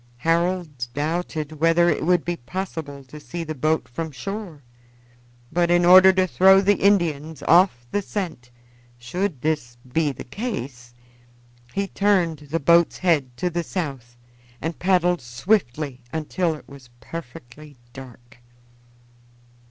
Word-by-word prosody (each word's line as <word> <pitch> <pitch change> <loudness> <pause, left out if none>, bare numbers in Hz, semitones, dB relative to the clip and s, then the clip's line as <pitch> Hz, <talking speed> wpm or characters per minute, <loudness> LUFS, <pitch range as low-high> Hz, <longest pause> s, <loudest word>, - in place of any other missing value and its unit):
Harold 165 -3 -1
doubted 155 0 -2
whether 165 +1 +4
it - - +1
would 175 0 +2
be 175 0 -1
possible 160 -2 -6
to 150 +3 -12
see 170 +3 -6
the 155 -1 -5
boat 155 +3 0
from 160 +7 -5
shore, 175 - -7 0.9
but 175 +1 +1
in 175 0 +4
order 185 +2 +9
to 185 0 +2
throw 190 +2 +5
the 200 +1 +3
Indians 160 -6 +1
off 170 -8 +4
the 205 - 0
scent, 175 - -5 0.5
should 150 +5 -3
this 150 -6 -2 0.2
be 160 -3 +2
the 135 - -9
case, 125 - -6 0.8
he 200 +6 -2
turned 190 -7 +1
the 165 +3 -1
boat's 170 +3 +4
head 145 -9 0
to 180 - -1
the 170 +1 -1
south 135 -10 -5 0.4
and 165 +1 -4
paddled 180 -2 +2
swiftly 130 - -1
until 160 +2 -1
it 150 - -14
was 135 -3 -14
perfectly 145 +1 -10 0.2
dark. 120 -3 -13
160 Hz, 135 wpm, -23 LUFS, 140-180 Hz, 0.9 s, order